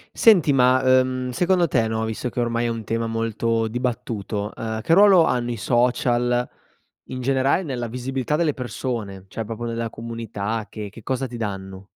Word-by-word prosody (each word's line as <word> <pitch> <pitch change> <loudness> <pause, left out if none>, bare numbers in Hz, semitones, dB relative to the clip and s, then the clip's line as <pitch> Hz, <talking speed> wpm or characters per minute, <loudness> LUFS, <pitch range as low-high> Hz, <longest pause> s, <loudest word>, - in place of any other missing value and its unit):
Senti 185 -10 +5
ma, 130 0 +4
uhm, 130 0 +2
secondo 175 +6 +2
te 120 -5 +1
no, 110 0 -1
visto 110 +3 -3
che 125 - -5
ormai 120 0 0
è - - +1
un 115 -1 -3
tema 115 +1 -2
molto 115 0 -1
dibattuto, 110 -3 -3
uhm, 110 -1 -4
che 165 - +2
ruolo 195 -3 +7
hanno 120 -4 0
i - - -2
social, 120 +2 +1 0.6
in 130 0 -5
generale, 135 +5 +2
nella 125 -7 -3
visibilità 130 +4 -2
delle 155 -2 +1
persone 115 -6 -4
cioè 110 +3 -5
proprio 115 +2 -5
nella 115 0 -3
comunità 115 -2 -4
che 105 -2 -6
che 110 +2 -13
cosa 130 +2 -2
ti 120 -1 -8
danno? 95 -3 -5
120 Hz, 175 wpm, -23 LUFS, 110-130 Hz, 0.6 s, ruolo